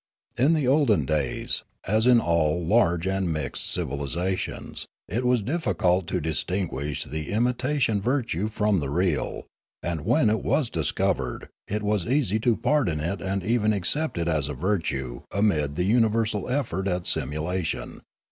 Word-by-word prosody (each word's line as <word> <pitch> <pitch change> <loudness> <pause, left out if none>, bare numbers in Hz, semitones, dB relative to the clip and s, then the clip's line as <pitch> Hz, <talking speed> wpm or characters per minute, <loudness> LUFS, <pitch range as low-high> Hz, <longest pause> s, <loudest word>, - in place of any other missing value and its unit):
In 140 +7 +4
the 150 -5 +1
olden 135 -6 +3
days, 75 -5 -1 0.2
as 110 +5 +2
in 125 -2 +7
all 85 -3 +1
large 85 -4 +3
and 95 -2 0
mixed 75 -1 -2
civilisations, 85 +7 -3 0.2
it 115 +8 -2
was 125 -3 +2
difficult 95 - +1
to 90 - -1
distinguish 75 -3 -2
the 75 +2 -5
imitation 120 0 +1
virtue 115 - 0
from 105 -2 +1
the 70 -3 -3
real, 85 -2 -1 0.4
and 85 -3 -2
when 115 - +3
it 110 - 0
was 135 -7 +1
discovered 80 -4 -1 0.2
it 105 +1 -2
was 105 -4 0
easy 120 -6 +1
to 115 0 +2
pardon 110 - +1
it 85 +6 -2
and 95 0 -2
even 110 0 +2
accept 125 - -1
it 85 0 -1
as 75 -4 0
a 75 - -4
virtue 65 -7 -2
amid 80 -8 +1
the 90 - 0
universal 110 -1 +2
effort 110 -9 -1
at 90 -2 -1
simulation. 80 +4 -2
95 Hz, 150 wpm, -25 LUFS, 80-115 Hz, 0.4 s, in